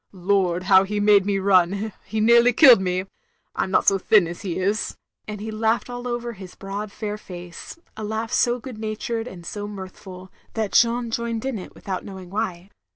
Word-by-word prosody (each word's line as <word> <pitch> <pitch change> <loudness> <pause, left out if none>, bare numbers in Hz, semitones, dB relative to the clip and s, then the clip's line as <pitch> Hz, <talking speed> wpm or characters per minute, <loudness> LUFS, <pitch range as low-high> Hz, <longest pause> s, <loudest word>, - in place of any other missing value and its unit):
"Lord, 185 -1 +1
how 190 0 +6
he 205 +2 -3
made 205 -1 +4
me 200 -1 +1
run 195 +2 +2
— - - -36
he 220 - -3
nearly 235 +2 +5
killed 250 -5 +8
me. 185 0 -1 0.5
I - - 0
'm - - -7
not - - +2
so 195 -1 +4
thin 200 -2 +4
as 170 +1 -7
he 190 -5 -4
is," 200 +4 -1 0.3
and 210 -1 -6
he 220 +2 -5
laughed 220 +3 0
aU 245 0 -5
over 240 -1 -3
his 190 -3 -11
broad 200 +1 -6
fair 210 0 -5
face; 175 - -10 0.2
a 220 - -7
laugh 220 +1 -3
so 240 0 +2
good 245 -3 -9
natured 225 +1 -3
and 175 -7 -10
so 205 +3 -5
mirthful 190 -2 -10 0.2
that 220 -3 -1
Jeanne 235 0 +3
joined 230 0 -2
in 265 -6 -2
it 180 - -11
without 190 -2 -5
knowing 190 -2 -10
why. 195 -3 -3
205 Hz, 205 wpm, -23 LUFS, 190-225 Hz, 0.5 s, killed